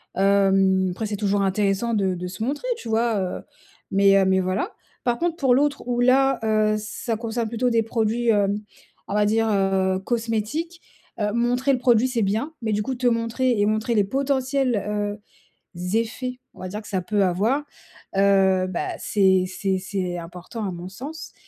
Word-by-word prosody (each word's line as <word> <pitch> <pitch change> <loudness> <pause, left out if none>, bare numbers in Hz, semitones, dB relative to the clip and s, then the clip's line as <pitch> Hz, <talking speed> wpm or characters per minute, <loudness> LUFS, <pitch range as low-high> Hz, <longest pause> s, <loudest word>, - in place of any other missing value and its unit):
Hem, 195 -1 +3
après, 215 +5 -4
c'est 210 - -3
toujours 205 -1 0
intéressant 200 +3 0
de 195 -3 +1
de 180 +1 -5
se 195 +5 -6
montrer, 290 - -3
tu 235 - -8
vois? 225 -1 +1
Heu, 185 -1 -3 0.5
mais, 195 0 +5
heu, 190 - +3
mais 190 0 +3
voilà. 185 - -2 0.3
Par 240 -1 +1
contre, 340 -1 -1
pour 260 -3 +3
l'autre 285 -2 0
où 245 0 0
là, 265 +1 +4
heu, 215 -1 +2
ça 215 +2 -4
concerne 230 +1 -3
plutôt 235 +3 0
des 230 -1 +3
produits, 225 +1 -1
hem, 205 -1 +2 0.5
on - - -4
va 210 0 +3
dire, 225 +2 +2
heu, 195 -1 +1
cosmétiques, 235 - -2 0.4
heu, 210 -1 0
montrer 245 +3 +1
le 255 - 0
produit, 240 -1 +4
c'est 250 -3 -1
bien. 220 +10 -1
Mais 220 -2 -1
du 210 +1 0
coup, 260 - -3
te 250 0 0
montrer 230 +1 +1
et 205 - +3
montrer 215 +2 0
les 205 - +4
potentiels, 265 +2 0
heu, 205 0 -2 0.6
z 180 +3 -3
effets, 250 +3 -3
on - - -18
va 185 - -4
dire 210 +4 -5
que - - -14
ça 190 -3 -1
peut 200 +2 +1
avoir, 210 +11 +1 0.5
heu, 190 -1 +4
bah, 185 -2 -3
c'est 190 -2 +3
c'est 190 +1 -1
c'est 185 -2 -3
important 180 +6 -7
à 190 - -2
mon 175 +1 -7
sens. 275 +11 -8
215 Hz, 190 wpm, -23 LUFS, 195-240 Hz, 0.6 s, mais